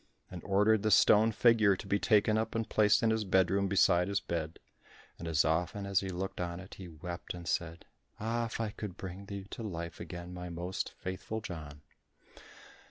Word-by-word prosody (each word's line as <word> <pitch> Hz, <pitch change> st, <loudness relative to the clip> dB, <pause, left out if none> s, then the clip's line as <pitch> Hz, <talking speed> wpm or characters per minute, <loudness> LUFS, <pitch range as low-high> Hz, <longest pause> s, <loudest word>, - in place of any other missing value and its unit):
and 90 Hz, -2 st, -7 dB
ordered 105 Hz, +2 st, +3 dB
the 110 Hz, -, +1 dB
stone 110 Hz, +2 st, +6 dB
figure 110 Hz, -2 st, +4 dB
to 95 Hz, -, -9 dB
be 100 Hz, +1 st, +1 dB
taken 105 Hz, +1 st, +3 dB
up 110 Hz, +1 st, -1 dB
and 115 Hz, -1 st, -1 dB
placed 105 Hz, 0 st, +4 dB
in 115 Hz, -, +4 dB
his 110 Hz, -1 st, 0 dB
bedroom 95 Hz, 0 st, +2 dB
beside 90 Hz, -2 st, +4 dB
his 100 Hz, 0 st, 0 dB
bed. 80 Hz, -3 st, -4 dB, 0.6 s
And 85 Hz, -, -6 dB
as 80 Hz, -3 st, +2 dB
often 90 Hz, +6 st, 0 dB
as 100 Hz, -1 st, +2 dB
he 95 Hz, -, -4 dB
looked 95 Hz, +1 st, -4 dB
on 85 Hz, 0 st, -3 dB
it 95 Hz, 0 st, -11 dB
he 95 Hz, -, -9 dB
wept 85 Hz, +2 st, -7 dB
and 85 Hz, -1 st, -9 dB
said, 85 Hz, -2 st, -2 dB, 0.3 s
"Ah, 115 Hz, +2 st, -1 dB
if 115 Hz, -, -6 dB
I 110 Hz, -2 st, -1 dB
could 100 Hz, -4 st, -7 dB
bring 95 Hz, +1 st, -7 dB
thee 100 Hz, -1 st, -6 dB
to -, -, -6 dB
life 85 Hz, -6 st, -5 dB
again, 90 Hz, 0 st, -7 dB
my 90 Hz, 0 st, -6 dB
most 85 Hz, +2 st, -3 dB
faithful 95 Hz, +4 st, -5 dB
John." 75 Hz, -8 st, -8 dB
95 Hz, 195 wpm, -32 LUFS, 85-105 Hz, 0.6 s, stone